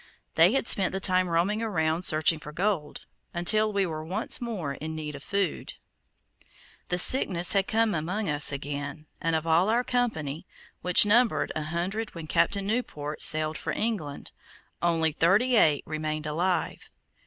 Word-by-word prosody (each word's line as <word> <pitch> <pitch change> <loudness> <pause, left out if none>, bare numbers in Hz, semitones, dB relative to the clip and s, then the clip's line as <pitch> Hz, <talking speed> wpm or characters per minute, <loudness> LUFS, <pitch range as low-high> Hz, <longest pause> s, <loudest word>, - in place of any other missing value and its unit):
They 170 +6 +5
had 270 - 0
spent 190 -2 +2
the 190 - -2
time 185 -2 +1
roaming 180 +6 0
around 165 -6 -1
searching 155 -1 +2
for 150 - -10
gold, 175 -3 -2 0.3
until 215 +5 +1
we 200 -2 +1
were 155 -3 -5
once 180 +9 -3
more 200 -12 -4
in 160 +3 -6
need 150 -1 -5
of 145 - -9
food. 200 -1 -3 1.1
The 180 - 0
sickness 180 -4 +4
had 195 -1 +1
come 225 -1 +1
among 180 +7 -2
us 150 -2 +2
again, 145 +2 -5 0.2
and 165 0 0
of 160 0 -2
all 165 +5 +3
our 235 +3 +2
company, 165 - -2 0.3
which 180 +3 +6
numbered 230 +3 +2
an 155 - -3
hundred 180 +8 -4
when 165 -2 -7
Captain 170 +5 +1
Newport 155 -10 -3
sailed 155 0 +2
for - - -4
England, 195 -11 -4 0.5
only 165 -2 +2
thirty 200 - +2
eight 150 -9 +3
remained 155 0 -4
alive. 175 +4 -2
170 Hz, 160 wpm, -27 LUFS, 155-205 Hz, 1.1 s, which